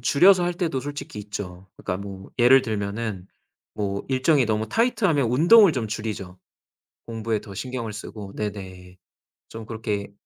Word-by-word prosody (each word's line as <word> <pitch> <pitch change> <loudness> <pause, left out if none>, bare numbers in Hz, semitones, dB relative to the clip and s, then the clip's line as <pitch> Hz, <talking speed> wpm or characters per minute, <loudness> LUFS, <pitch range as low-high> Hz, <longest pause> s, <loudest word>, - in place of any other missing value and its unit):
줄여서 180 +9 +5
할 175 0 -1
때도 165 -7 -1
솔직히 145 -6 -7
있죠. 95 -3 -7
그니까 90 - -3
뭐 100 -1 -9
예를 125 +2 +7
들면은 105 -3 -3 0.5
뭐 100 -2 -2
일정이 130 0 +3
너무 110 0 -1
타이트하면 200 - +2
운동을 175 - +7
좀 125 -6 -2
줄이죠 105 -4 -5 0.7
공부에 115 -1 -2
더 100 - -10
신경을 120 -1 -4
쓰고. 105 -2 -8
네네. 95 -3 -6 0.5
좀 110 -1 -8
그렇게 105 -3 -4
110 Hz, 310 characters per minute, -24 LUFS, 100-135 Hz, 0.7 s, 예를